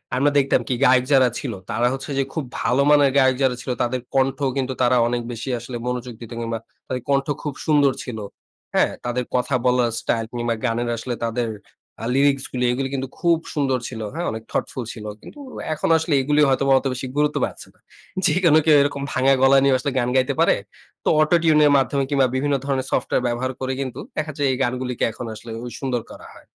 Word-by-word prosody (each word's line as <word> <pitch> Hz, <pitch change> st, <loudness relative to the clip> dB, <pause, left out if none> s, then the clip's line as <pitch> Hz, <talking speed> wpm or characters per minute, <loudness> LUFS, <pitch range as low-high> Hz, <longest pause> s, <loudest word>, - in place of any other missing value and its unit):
আমরা 145 Hz, +3 st, +3 dB
দেখতাম 135 Hz, -2 st, +3 dB
কি? 130 Hz, -, 0 dB
গায়ক 125 Hz, 0 st, +5 dB
যারা 130 Hz, -2 st, +6 dB
ছিল, 125 Hz, -5 st, -4 dB, 0.2 s
তারা 120 Hz, +2 st, +1 dB
হচ্ছে 135 Hz, +2 st, -6 dB
যে 135 Hz, -, +3 dB
খুব 155 Hz, -, -2 dB, 0.2 s
ভালো 130 Hz, +3 st, +2 dB
মানের 145 Hz, -2 st, +5 dB
গায়ক 130 Hz, -1 st, +4 dB
যারা 125 Hz, -2 st, +2 dB
ছিল, 125 Hz, -, -4 dB
তাদের 120 Hz, +1 st, -1 dB
কণ্ঠও 135 Hz, +1 st, +1 dB
কিন্তু 130 Hz, -1 st, -1 dB
তারা 125 Hz, 0 st, +4 dB
অনেক 120 Hz, 0 st, -1 dB
বেশি 120 Hz, +3 st, -5 dB
আসলে 120 Hz, +1 st, -6 dB
মনোযোগ 125 Hz, -1 st, -3 dB
দিত 115 Hz, -, -9 dB
কিংবা 115 Hz, -1 st, -3 dB, 0.3 s
তাদের 125 Hz, -1 st, -3 dB
কণ্ঠ 140 Hz, 0 st, +2 dB, 0.2 s
খুব 145 Hz, -3 st, -3 dB
সুন্দর 145 Hz, -3 st, +4 dB
ছিল। 120 Hz, -4 st, -6 dB, 0.6 s
হ্যাঁ, -, -, +3 dB
তাদের 120 Hz, +1 st, -1 dB
কথা 125 Hz, +2 st, +1 dB
বলার 125 Hz, -1 st, +3 dB
স্টাইল 115 Hz, -1 st, -1 dB
কিংবা 120 Hz, -1 st, -1 dB
গানের 120 Hz, +1 st, 0 dB
আসলে 120 Hz, +2 st, -4 dB
তাদের 115 Hz, 0 st, -1 dB, 0.5 s
আ -, -, -2 dB
lyrics 140 Hz, -1 st, +3 dB
গুলি, 125 Hz, -1 st, -1 dB
এগুলো 135 Hz, +2 st, -1 dB
কিন্তু 135 Hz, 0 st, -3 dB
খুব 170 Hz, -2 st, +3 dB, 0.2 s
সুন্দর 135 Hz, -4 st, +1 dB
ছিল। 110 Hz, -3 st, -7 dB
হ্যাঁ, 170 Hz, +2 st, -3 dB
অনেক 110 Hz, 0 st, -6 dB
thoughtful 130 Hz, -, -2 dB
ছিল। 110 Hz, -3 st, -9 dB, 0.2 s
কিন্তু 295 Hz, -, -13 dB, 0.3 s
এখন 155 Hz, -, -2 dB
আসলে 160 Hz, -1 st, -1 dB
এগুলো 150 Hz, +3 st, +1 dB
হয়তোবা 135 Hz, +1 st, +2 dB
অত -, -, -14 dB
বেশি 130 Hz, +1 st, -5 dB
গুরুত্ব 150 Hz, 0 st, +2 dB
পাচ্ছে -, -, -9 dB
না। -, -, -32 dB, 0.5 s
যেকোনো 170 Hz, -4 st, +4 dB
কেউ 155 Hz, -, +6 dB
এরকম 140 Hz, 0 st, -1 dB
ভাঙা 135 Hz, +1 st, +3 dB
গলা 135 Hz, +1 st, +6 dB
নিয়ে 135 Hz, -1 st, +4 dB
আসলে 135 Hz, +2 st, -2 dB
গান 120 Hz, 0 st, 0 dB
গাইতে 130 Hz, +2 st, +2 dB
পারে। 165 Hz, -, +5 dB, 0.5 s
তো -, -, -5 dB
auto 155 Hz, +3 st, +4 dB
tune 155 Hz, -2 st, +5 dB
এর 145 Hz, -, +5 dB
মাধ্যমে 135 Hz, +1 st, +1 dB
কিংবা 135 Hz, -3 st, +3 dB
বিভিন্ন 140 Hz, +1 st, +1 dB
ধরনের 135 Hz, -1 st, -1 dB
সফটওয়্যার 125 Hz, -, 0 dB
ব্যবহার 125 Hz, +2 st, -1 dB
করে 130 Hz, 0 st, -2 dB
কিন্তু 130 Hz, -3 st, -5 dB, 0.2 s
দেখা 155 Hz, 0 st, -2 dB
যায় 145 Hz, -, +1 dB
এই 130 Hz, -, -1 dB
গানগুলিকে 125 Hz, 0 st, -2 dB
এখন 120 Hz, -, -7 dB
আসলে 115 Hz, +1 st, -10 dB
ওই 120 Hz, -, -6 dB
সুন্দর 125 Hz, -4 st, -1 dB
করা -, -, -12 dB
হয়। -, -, -15 dB
130 Hz, 210 wpm, -22 LUFS, 125-140 Hz, 0.6 s, যারা